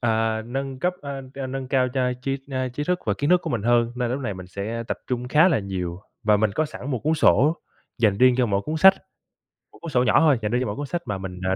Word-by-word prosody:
à, 110 -1 0
nâng 135 +2 -4
cấp, 180 +6 0
a, 140 -1 -5
a, 135 -1 -4
nâng 130 0 -5
cao 130 -2 +2
cho 125 -1 +1
tri, 135 +1 -1
a, 130 -1 -1
trí 145 +4 -4
thức 180 +2 0
và 100 - +1
kiến 145 +4 0
thức 180 - +5
của - - -4
mình 115 -4 -1
hơn, 120 0 +2
nên 125 -1 -1
lúc 130 - -2
này 110 -7 -3
mình 90 -1 -9
sẽ 105 +5 -4
tập - - -2
trung 125 -1 -3
khá 155 +7 +5
là 160 - +2
nhiều 95 -3 -4 0.2
và 105 -2 +4
mình 110 0 +1
có 155 - +1
sẵn 145 -2 -7
một 125 - -1
cuốn 155 +5 0
sổ 155 +1 +4 0.4
dành 105 -3 +2
riêng 130 0 +6
cho 125 - +2
mỗi 100 -2 0
cuốn 155 +1 -3
sách. 190 +4 +7 0.8
Một - - -18
cuốn 165 -2 -6
sổ 125 -2 +3
nhỏ 125 - +4
thôi, 150 -6 +4
dành 105 - -2
riêng 125 +1 +1
cho 130 - -1
mỗi 105 - -3
cuốn 145 - -4
sách 170 +5 -3
mà 105 - -3
mình, 95 -1 -7
ờ, 95 - +1
125 Hz, 285 wpm, -24 LUFS, 110-140 Hz, 0.8 s, sách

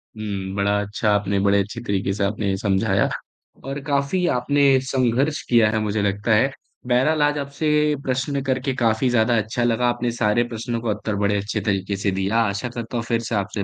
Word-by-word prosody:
हुँ। 100 -3 -4
बड़ा 100 +1 +1
अच्छा 105 +1 -2
आपने, 100 -1 0
बड़े 100 0 +3
अच्छे 105 +4 -6
तरीके 100 -3 -1
से 100 0 -2
आपने 100 -1 -1
समझाया। 95 -2 +1 0.6
और 135 +1 -4
काफ़ी 140 +6 0
आपने 145 +3 +1 0.2
संघर्ष 130 +3 +1
किया 115 -3 +5
है 110 - 0
मुझे 105 0 -1
लगता 100 +3 -1
है। 135 +5 +3 0.4
बहरहाल 140 +5 +2
आज 145 0 +2
आपसे 140 +2 -2 0.3
प्रश्न 135 +2 -1
करके 130 0 -1
काफ़ी 120 0 +1
ज़्यादा 115 0 +2
अच्छा 110 +3 -1
लगा, 120 +1 +2
आपने 120 0 -1
सारे 115 0 +1
प्रश्नों 115 0 -4
का 115 - -2
उत्तर 105 0 -2
बड़े 100 0 +1
अच्छे 100 +2 -3
तरीके 100 -1 -1
से 100 -1 0
दिया। 95 +4 0
आशा 100 +5 -2
करता 120 0 -5
हूँ 115 - -2
फिर 115 -1 +1
से 115 - -1
आपसे 100 0 -2
115 Hz, 195 wpm, -22 LUFS, 100-125 Hz, 0.6 s, किया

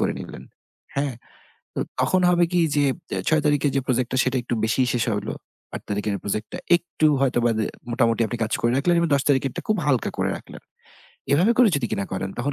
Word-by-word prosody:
করে - - +1
নিলেন। - - -9 0.5
হ্যাঁ, 140 -3 -1 0.6
তো - - -2 0.2
তখন 185 0 +2
হবে 175 0 +4
কি 175 - +3 0.2
যে 145 - +3 0.3
এ - - -1
৬ 155 -1 +3
তারিখে 145 -1 +2
যে 135 - +3
project 125 -1 0
সেটা 130 0 0
একটু 120 - -3
বেশিই 120 +3 +2
শেষ 120 -2 +1
হলো। 105 - -3 0.4
৮ - - -5
তারিখের 105 0 -1
project 105 +2 -2
টা - - -3 0.2
একটু 165 -3 0
হয়তোবা 120 -3 +2
দে 110 - 0 0.3
মোটামুটি 115 -1 +2
আপনি 120 - -4
কাজ 110 - -3
করে 120 0 +2
রাখলেন 175 +5 +2
এবং 170 - +2
১০ 140 - +1
তারিখেরটা 135 -1 +1
খুব 215 -1 +2
হালকা 130 -5 +1
করে - - 0
রাখলেন। - - -13 0.7
এভাবে 180 +11 +4
করে 245 -4 +7
যদি 125 -4 -1
কিনা 100 - -1
করেন 95 0 -3
তখন 140 +4 -1
130 Hz, 205 wpm, -23 LUFS, 115-150 Hz, 0.7 s, করে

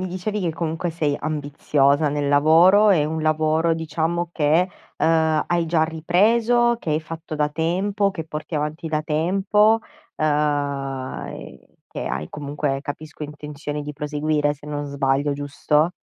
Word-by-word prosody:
mi 185 - -2
dicevi 185 +4 -3
che, 170 -4 -1
comunque, 165 +1 -2
sei 155 -3 -1
ambiziosa 145 -1 +1
nel 145 0 -1
lavoro. 165 +9 +6
È 165 -7 +4
un 160 +1 -3
lavoro 155 +1 +2
diciamo, 165 +2 -2
che, 160 +4 +2 0.3
ehm, 160 -1 +2
hai 170 -1 0
già 160 -1 +2
ripreso, 225 +9 +2
che 160 - -4
hai 155 +1 +1
fatto 160 0 -7
da 150 0 +1
tempo, 195 +6 0
che 165 -5 -6
porti 155 +1 -6
avanti 150 +2 -3
da 155 0 -1
tempo, 195 +8 +2 0.4
ehm, 145 -3 -1
e - - -12
che - - -6
hai, 75 - -3
comunque, 145 -2 -3
capisco, 150 +1 -7
intenzione 150 0 -6
di 150 0 -6
proseguire 150 0 0
se 145 +1 -15
non 145 -1 -3
sbaglio, 140 0 0
giusto? 145 +3 0
155 Hz, 150 wpm, -22 LUFS, 145-170 Hz, 0.4 s, lavoro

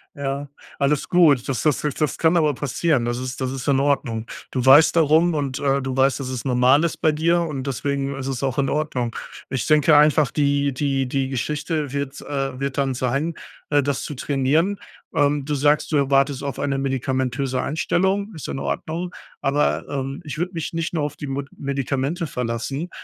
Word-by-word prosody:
Ja, 140 0 -3 0.3
alles 140 0 +1
gut. 155 -8 +4
Das 135 -3 -1
das 150 -3 +1
jetzt 150 0 -3
das 150 - 0
kann 165 +1 +3
aber 155 -3 +3
passieren. 145 -1 0
Das 120 0 -1
ist 130 +1 -5
das 130 -1 -1
ist 130 -2 -6
in 135 -2 +3
Ordnung. 135 -5 0 0.3
Du 125 -1 -1
weißt 145 +6 +7
darum 165 +2 +4
und, 140 -3 -2
äh, 140 -1 +1
du 130 -1 -3
weißt, 135 0 +3
dass 135 -2 -4
es 125 -3 -4
normal 130 +3 +4
ist 170 - -1
bei 160 - +2
dir 165 +3 +2
und 145 -5 -4
deswegen 140 +1 -2
ist 135 -1 -5
es 135 -2 -3
auch 130 -2 -1
in 140 -1 +1
Ordnung. 130 -6 -2 0.3
Ich 130 -3 -2
denke 150 0 +5
einfach, 150 -1 +5
die 140 -1 +1
die 135 -1 0
die 135 +1 -1
Geschichte 150 +2 -2
wird, 140 -1 -3
äh 135 -2 -3
wird 140 0 -3
dann 135 -2 0
sein, 135 +6 -1 0.3
äh, 145 -1 +3
das 140 -1 -1
zu 145 - -5
trainieren. 150 +9 +1 0.4
Ähm, 145 -1 +2
du 150 0 -1
sagst, 145 +3 +2
du 155 - +3
erwartest 140 0 +2
auf 140 -1 -4
eine 140 -1 -1
medikamentöse 130 -1 -1
Einstellung. 190 +6 0
Ist 155 - -7
in 70 -1 -4
Ordnung, 160 - -3 0.3
aber, 145 +2 +1
ähm, 135 +1 -4
ich 150 -2 -6
würde 180 +2 -2
mich 165 -3 -4
nicht 165 0 -2
nur 160 - 0
auf 145 - -3
die - - -6
Mod 135 +1 -3
Medikamente 140 +4 -2
verlassen, 125 +6 -3
140 Hz, 200 wpm, -22 LUFS, 130-150 Hz, 0.4 s, weißt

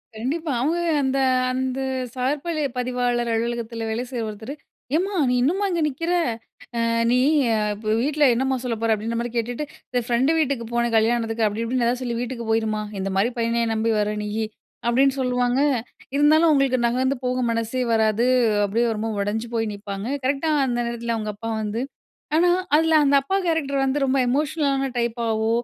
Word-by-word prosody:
கண்டிப்பா. 290 +8 -2
அவுங்க 315 +6 +1 0.3
அந்த, 265 0 0 0.3
அந்த 260 0 -2 0.4
சார் 260 +4 0
பளி 330 -3 -1 0.2
பதிவாளர் 245 -1 0
அலுவலகத்தில 230 0 -2
வேலை 225 +2 -2
செய்ற 245 -3 -3
ஒருத்தரு, 220 +6 -7 0.4
"ஏம்மா! 380 +5 0 0.2
நீ - - +2
இன்னும்மா 365 +10 +1
இங்க 340 -2 0
நிக்கிற? 330 +5 -2 0.7
அ - - +2 0.3
நீ 250 - +4 0.5
இப்ப 215 +1 -2
வீட்ல 295 +3 +1
என்னம்மா 265 +2 0
சொல்லப்போற? 230 -2 0
அப்பிடீன்றமாரி 230 +2 -3
கேட்டுட்டு, 240 +5 -2 0.3
இந்த 250 -1 +1
ஃப்ரெண்டு 250 +6 +2
வீட்டுக்கு 275 -6 0
போனேன், 235 -1 +1
கல்யாணத்துக்கு 225 0 +1
அப்பிடி, 210 +2 -3
இப்பிடின்னு 240 0 0
எதாச்சு 245 +2 0
சொல்லி 240 -2 -2
வீட்டுக்கு 245 -2 -5
போயிரும்மா! 220 -1 0 0.2
இந்தமாரி 195 +4 0
பையனயா 230 0 +1
நம்பி 225 +1 +1
வர 210 0 0
நீயி?" 215 +1 -2 0.4
அப்பிடீன்னு 265 +3 +3
சொல்லுவாங்க, 250 0 +1 0.6
இருந்தாலும் 305 +3 +5
அவுங்களுக்கு 275 -3 +3
நகர்ந்து 260 +3 +1
போக 250 0 0
மனசே 230 +2 -1
வராது. 220 +1 +2 0.4
அப்பிடியே 220 +4 +1
ரொம்ப 225 +1 -2
உடஞ்சு 210 +3 -2
போய் 225 0 +1
நிப்பாங்க. 200 +1 -6 0.2
கரெக்ட்டா 275 +4 0 0.2
அந்த 240 -1 -1
நேரத்தில 235 0 -3
அவுங்க 215 -1 -3
அப்பா 225 +2 -5
வந்து 215 +3 -2 0.5
ஆனா, 350 +2 +4 0.3
அதில 320 +1 +3
அந்த 280 0 +4
அப்பா 385 +8 -1
கேரக்ட்ரு 315 -5 0
வந்து 270 +2 +1
ரொம்ப 270 0 +2
எமோஷனலான 275 +1 0
டைப்பாவோ! 225 -2 0
245 Hz, 160 wpm, -23 LUFS, 225-275 Hz, 0.7 s, இருந்தாலும்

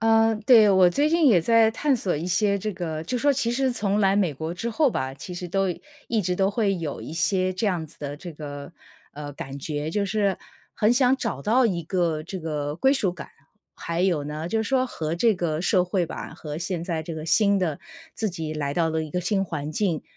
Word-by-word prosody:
呃， 225 0 +4
对， 230 -5 +8
我 185 -2 +6
最 290 +9 +2
近 330 -1 +3
也 200 -9 +6
在 225 +4 +4
探 280 +3 +1
索 195 -6 -1
一 160 +4 -4
些 200 +2 +2
这 215 +2 -3
个 160 -3 -4
就 250 - -2
说 285 +4 +3
其 245 -3 0
实 260 +1 +1
从 205 -3 0
来 195 -1 +3
美 190 -7 +1
国 160 +4 -4
之 205 +7 -4
后 290 +3 +2
吧， 130 - -3
其 145 +6 -9
实 175 0 -6
都 195 +2 +1 0.4
一 225 -2 +1
直 180 0 -1
都 195 +1 +2
会 205 -2 +1
有 160 -5 -4
一 - - -8
些 185 +2 +1
这 185 +4 -2
样 175 -5 -1
子 155 - -20
的 145 0 -5
这 175 +2 -8
个 145 -2 -8 0.4
呃， 145 0 -7
感 135 0 -7
觉 145 +1 -3
就 200 +4 0
是 200 -1 0 0.4
很 215 +3 +3
想 255 +1 +4
找 140 - -3
到 235 - +3
一 175 -6 -1
个 165 -2 -1
这 185 +4 -6
个 150 -3 -3
归 265 +8 +3
属 205 -10 0
感。 175 - -9 0.5
还 170 0 -3
有 175 -6 +1
呢， 155 +3 -5
就 220 +3 0
是 220 - -5
说 260 -1 +2
和 160 -9 -3
这 220 +5 +3
个 165 -4 -2
社 180 0 +3
会 180 -1 0
吧， - - -7
和 150 -2 -7
现 175 0 -3
在 165 -3 -2
这 165 +1 -6
个 155 0 -6
新 200 +4 +3
的 165 -6 -1 0.4
自 220 -2 -1
己 160 -3 -5
来 145 -2 -2
到 165 0 +2
了 160 0 -1
一 155 - -7
个 180 - -1
新 195 +2 0
环 155 -4 -4
境， 175 -4 0
180 Hz, 255 characters per minute, -25 LUFS, 160-215 Hz, 0.5 s, 对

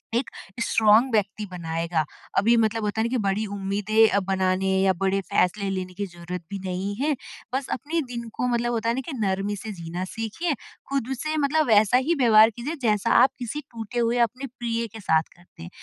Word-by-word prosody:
एक 245 - 0 0.3
स्ट्राँग 220 +3 +4
व्यक्ति 210 0 0
बनाएगा। 165 -1 -1 0.3
अभी 230 +4 +5
मतलब 225 0 +1
होता 210 +1 -1
है - - +1
ना - - -5
कि 255 - +1
बड़ी 200 +2 0
उम्मीदें 205 +2 +2
अ, 200 - +2
बनाने 190 0 +1
या 195 0 +4
बड़े 195 +2 0
फ़ैसले 195 +2 +1
लेने 185 -1 -4
की 200 +2 -3
ज़रूरत 175 0 -7
भी 200 - -4
नहीं 185 +2 -2
है 290 +6 0 0.4
बस 270 0 -2
अपनी 320 +5 -2
दिन 235 -1 -5
को 250 - -1
मतलब 240 0 0
होता 230 0 0
है 235 - +1
ना 265 - -2
कि - - -5
नरमी 200 0 0
से 215 +2 -6
जीना 170 +1 -5
सीखिए, 225 - -3 0.4
खुद 275 -4 -1
से 310 +2 -2
मतलब 300 +2 +2
वैसा 220 +1 +5
ही 305 +7 +1
व्यवहार 225 -3 +7
कीजिए 245 +9 -5
जैसा 210 -4 +1
आप 265 - +5
किसी 250 +5 -4
टूटे 230 +1 -5
हुए 235 +1 +1
अपने 255 +5 -9
प्रिय 230 -1 -1
के 225 - -8
साथ 160 -4 +3
करते 175 - -15
हैं। 85 - -8
215 Hz, 205 wpm, -25 LUFS, 190-240 Hz, 0.4 s, व्यवहार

